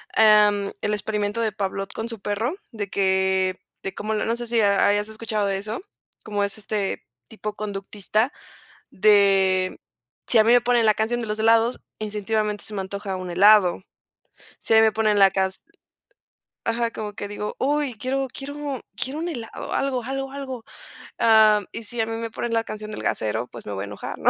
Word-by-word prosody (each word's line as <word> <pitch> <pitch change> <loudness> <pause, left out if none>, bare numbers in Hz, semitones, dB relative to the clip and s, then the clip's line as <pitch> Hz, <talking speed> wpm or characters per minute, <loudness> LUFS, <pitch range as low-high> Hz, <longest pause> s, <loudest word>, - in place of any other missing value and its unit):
em, 210 -2 +5
el 210 0 0
"Experimento 210 +1 -1
de 220 - +1
Pavlov" 195 -1 -3
con 225 +1 -4
su 230 -2 -5
perro, 210 - -2 0.2
de 205 -4 -4
que 190 -1 +1 0.3
de 195 - -5
como 215 +1 -3
lo 210 - 0
no 230 - 0
sé 240 -1 -5
si 235 - 0
ya 200 -3 +4
hayas 205 +1 +1
escuchado 220 -1 -2
de 195 -1 0
eso, 210 +4 -4 0.4
como 205 -1 -1
es 200 +1 -2
este 205 -1 -3 0.2
tipo 210 -1 -6
conductista, 210 +3 -2 0.6
de, 195 -2 +4
mm, - - -13 0.5
si 240 - +4
a 215 - +7
mí 230 - +4
me 245 - +6
ponen 240 -1 +2
la 215 - +5
canción 225 +3 -1
de 225 - -4
los 210 +1 -3
helados, 230 +2 +3 0.2
instintivamente 210 0 -2
se 215 - -8
me 200 - -2
antoja 195 0 -5
un 185 -1 -6
helado. 195 0 +5 0.8
Si - - -1
a 220 - +7
mí - - +8
me 220 - +5
ponen 215 -2 +2
la 195 -1 +7
cas 190 0 0 1.1
ajá, 230 0 0
como 210 -1 -5
que 205 -1 -5
digo: 210 +1 -5
"¡Uy, 285 -2 0
quiero 265 +4 -1
quiero 285 -1 -5
quiero 265 +3 -3
un 340 +2 -2
helado, 235 -8 -6
algo, 265 -3 0
algo, 270 +2 -4
algo!" 265 -4 -6 0.6
Ah, 220 -2 +6
mm, - - -12
y 230 - -6
si 230 +2 -3
a 220 - -1
mí 225 - -3
me 230 -1 -5
ponen 240 0 -3
la 225 0 +2
canción 215 -1 -7
del 215 - -6
gasero, 110 +2 -1
pues 120 - -11
me 105 - -4
voy 95 0 -3
a - - -4
enojar, 100 0 -7
¿no? - - +3
215 Hz, 205 wpm, -24 LUFS, 200-230 Hz, 1.1 s, mí